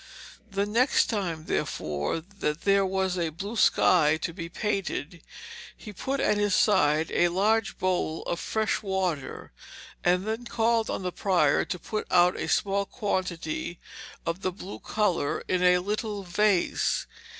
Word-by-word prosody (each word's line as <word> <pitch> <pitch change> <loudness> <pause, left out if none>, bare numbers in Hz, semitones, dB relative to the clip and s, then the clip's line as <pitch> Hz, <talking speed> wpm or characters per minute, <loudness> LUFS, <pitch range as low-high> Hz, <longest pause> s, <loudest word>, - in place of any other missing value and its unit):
The 200 0 0
next 235 +6 +2
time 175 -7 -3
therefore 75 - -2
that 170 -4 -4
there 200 0 +3
was 190 -1 -1
a 165 -2 0
blue 195 +8 -6
sky 160 -6 +4
to 170 - -2
be 165 -1 -6
painted, 185 -4 -3 0.6
he 210 - -10
put 270 +8 -3
at 210 - +2
his 205 -2 +2
side 155 -7 +3
a 175 - +3
large 205 +5 +1
bowl 180 -3 -1
of 170 - -3
fresh 220 0 -1
water, 185 -9 -3 0.5
and 180 +2 +2
then 220 +2 -3
called 230 -1 +1
on - - -3
the 180 - -2
prior 175 -7 +2
to 180 - -4
put 215 +5 -4
out 180 0 +4
a - - -3
small 200 0 +1
quantity 175 -6 -3 0.5
of 165 +3 -2
the 185 - -1
blue 190 +2 -9
colour 190 -9 0
in 185 -1 +1
a 180 0 +5
little 205 +2 -3
vase. 190 0 +1
185 Hz, 150 wpm, -27 LUFS, 170-205 Hz, 0.6 s, a